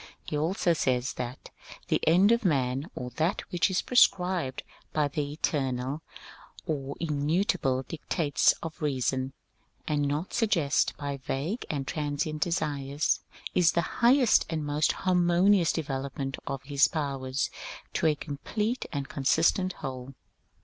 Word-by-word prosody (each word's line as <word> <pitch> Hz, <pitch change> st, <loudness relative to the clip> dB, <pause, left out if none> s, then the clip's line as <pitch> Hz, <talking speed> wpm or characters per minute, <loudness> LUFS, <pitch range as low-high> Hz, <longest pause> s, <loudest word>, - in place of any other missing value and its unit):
He -, -, -4 dB
also 170 Hz, +3 st, +1 dB
says 130 Hz, -4 st, 0 dB
that 125 Hz, +1 st, -6 dB, 0.3 s
^^ -, -, -40 dB
the -, -, +1 dB
end 185 Hz, +6 st, +6 dB
of 235 Hz, 0 st, +3 dB
man, 135 Hz, -4 st, 0 dB
or 125 Hz, 0 st, -5 dB
that 165 Hz, +5 st, +1 dB
which 175 Hz, +1 st, +2 dB
is 185 Hz, -, 0 dB
prescribed 180 Hz, -, +2 dB, 0.3 s
by 150 Hz, -2 st, +2 dB
the 145 Hz, 0 st, -3 dB
eternal 135 Hz, -2 st, -1 dB, 0.6 s
or 140 Hz, -5 st, -3 dB
immutable 150 Hz, -, 0 dB
dictates 155 Hz, 0 st, +1 dB
of 165 Hz, +1 st, -7 dB
reason, 130 Hz, -2 st, -1 dB, 0.5 s
and 145 Hz, -2 st, +1 dB
not 150 Hz, +6 st, -2 dB
sug 225 Hz, -2 st, +1 dB
eested 150 Hz, -6 st, +1 dB
by 140 Hz, -1 st, -4 dB
va^ue 145 Hz, -, -3 dB
and 140 Hz, -3 st, -2 dB
transient 150 Hz, 0 st, -2 dB
desires, 150 Hz, -4 st, 0 dB, 0.3 s
is 175 Hz, -2 st, +4 dB
the 170 Hz, -, +2 dB, 0.2 s
highest 245 Hz, 0 st, +5 dB
and 155 Hz, -2 st, -2 dB
most 145 Hz, +1 st, +2 dB
harmonious 180 Hz, 0 st, +4 dB
development 135 Hz, -2 st, -3 dB
of 135 Hz, -1 st, -4 dB
his 140 Hz, 0 st, +4 dB
powers 140 Hz, -4 st, -2 dB, 0.4 s
to -, -, +2 dB
a 155 Hz, -, +3 dB
complete 210 Hz, -, -3 dB
and 140 Hz, -3 st, -3 dB
con 140 Hz, -, -6 dB
sistent 180 Hz, +6 st, +3 dB
whole." 130 Hz, 0 st, -6 dB
150 Hz, 140 wpm, -28 LUFS, 135-175 Hz, 0.6 s, end